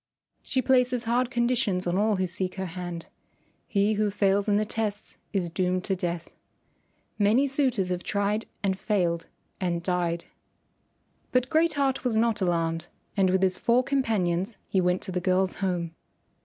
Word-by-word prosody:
She 260 -1 -1
places 250 -1 +3
hard 240 +1 +1
conditions 235 -6 +1
on 175 0 0
all 210 +2 +2
who 185 -1 0
seek 185 +1 -3
her 190 -1 -3
hand. 175 -1 -6 0.6
He 205 +1 +2
who 210 0 +1
fails 200 0 +2
in 205 - +4
the 215 - +1
tests 210 -1 -3
is 180 -4 -1
doomed 185 +1 0
to 195 - 0
death. 175 -2 -3 0.9
Many 215 +7 +4
suitors 260 -9 +1
have 180 -1 -1
tried 205 +3 -1 0.2
and 190 -1 0
failed 175 -6 0 0.3
and 170 -2 -1
died." 175 -2 -1 1.1
But 255 0 +1
Great 325 +1 +3
Heart 275 -2 0
was 240 -4 +1
not 225 -1 +2
alarmed, 165 -2 0 0.3
and 195 -3 +3
with 190 +1 +2
his 185 -1 +2
four 240 +2 +3
companions 215 -8 0
he 190 - +1
went 180 0 +1
to 190 - -4
the 180 0 -1
girl's 185 +1 +1
home. 175 -4 -1
195 Hz, 165 wpm, -27 LUFS, 180-230 Hz, 1.1 s, in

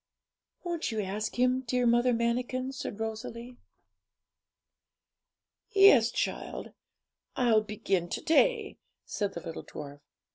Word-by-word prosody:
'Won't 340 -6 -2
you 220 - -2
ask 210 +4 -4
Him, 255 +1 +2
dear 250 +1 +1
Mother 240 +1 +4
Manikin?' 245 +2 -1
said 235 -5 -6
Rosalie. 230 +2 -6 2.1
'Yes, 390 - +6
child; - - -4 0.6
I'll 230 -4 +3
begin 195 -4 -2
to - - -3
day,' 435 +7 +2 0.3
said 200 -1 -3
the 170 - -5
little 165 -1 -7
dwarf. 145 -1 -9
235 Hz, 110 wpm, -29 LUFS, 215-255 Hz, 2.1 s, Yes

